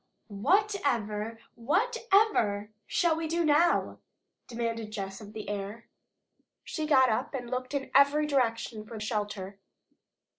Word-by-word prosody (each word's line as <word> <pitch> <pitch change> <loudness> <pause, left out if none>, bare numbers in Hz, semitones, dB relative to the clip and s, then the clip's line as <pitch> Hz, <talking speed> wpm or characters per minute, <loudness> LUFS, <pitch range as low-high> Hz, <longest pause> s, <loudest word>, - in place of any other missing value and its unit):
"Whatever, 230 - 0 0.2
whatever 380 - +1 0.2
shall 340 -2 +2
we 325 0 -3
do 335 +1 0
now?" 310 +3 +3 0.5
demanded 230 -2 -3
Jess 195 -1 -6
of 210 0 -11
the 215 -2 -7
air. 205 +3 -5 0.7
She 310 -2 -4
got 260 -4 +5
up 245 +5 -1
and 245 -2 -5
looked 255 +2 -3
in 275 -1 -3
every 280 +2 +5
direction 230 -6 0
for 220 0 -9
shelter. 205 -2 -4
235 Hz, 120 wpm, -29 LUFS, 215-300 Hz, 0.7 s, got